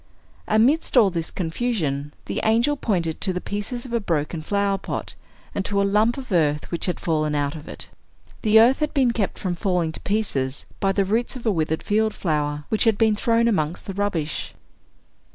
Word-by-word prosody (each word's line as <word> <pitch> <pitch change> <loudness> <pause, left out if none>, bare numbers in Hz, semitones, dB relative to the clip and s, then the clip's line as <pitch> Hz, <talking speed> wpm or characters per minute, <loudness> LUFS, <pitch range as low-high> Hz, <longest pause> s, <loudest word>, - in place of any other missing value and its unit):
Amidst 250 +8 +3
all 210 -5 +6
this 165 -2 -2
confusion, 160 - -2
the - - -2
angel 235 +7 +3
pointed 175 - -1
to 190 - +1
the 180 - -2
pieces 205 +6 -4
of 245 - -8
a 235 - +2
broken 165 -4 -1
flower 200 +3 0
pot, - - -5 0.4
and 200 - -1
to 200 -1 0
a 200 - +3
lump 215 +5 +2
of 260 -4 -8
earth 150 -4 +1
which 170 +3 -1
had 180 - -1
fallen 155 -2 0
out 145 0 -1
of 155 -1 -10
it. - - -6 0.5
The 220 -1 +6
earth 245 +4 +5
had 300 0 -1
been 260 -4 +4
kept 220 -4 -2
from 185 -3 -2
falling 175 -3 0
to - - -5
pieces 145 -11 -1
by 195 - +2
the 195 0 +1
roots 225 +7 0
of 250 - -9
a 220 - +3
withered 160 -3 -1
field 215 +1 +1
flower, 150 -3 -1
which 220 +2 +1
had 220 -3 +3
been 220 -1 +3
thrown 230 +2 +2
amongst 165 -6 0
the 195 - -5
rubbish. 185 -7 -2
200 Hz, 200 wpm, -23 LUFS, 160-225 Hz, 0.5 s, all